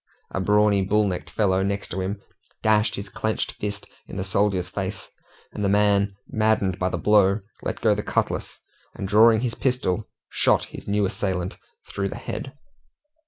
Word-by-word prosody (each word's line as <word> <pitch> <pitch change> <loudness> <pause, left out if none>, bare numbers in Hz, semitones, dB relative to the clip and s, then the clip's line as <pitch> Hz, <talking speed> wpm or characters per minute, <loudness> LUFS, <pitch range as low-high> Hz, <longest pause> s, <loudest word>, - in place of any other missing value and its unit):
A - - -2
brawny, 105 +1 +4
bull 105 +2 +2
necked 90 -2 -4
fellow 95 -3 +2
next 100 -1 -2
him 95 +2 -3 0.4
dashed 110 0 +3
his 100 - -5
clenched 110 0 -2
fist 105 0 -4 0.2
in - - -8
the 95 - -1
soldier's 95 -1 +1
face, 95 +1 -5 0.4
and 105 - -4
the 100 - +2
man 100 -1 +3
maddened 110 -3 +1
by 90 - +1
the - - -2
blow, 105 -1 +4 0.2
let - - -4
go 110 -2 +4
the 105 - -2
cutlass, - - -2 0.4
and 95 - -4
drawing 110 +2 +6
his 120 -2 -1
pistol, 120 -7 -1 0.2
shot - - +2
his - - -10
new 100 0 +2
assailant 95 -1 -2 0.3
through 100 0 -2
the - - -6
head. 135 - -5
100 Hz, 165 wpm, -24 LUFS, 95-105 Hz, 0.4 s, drawing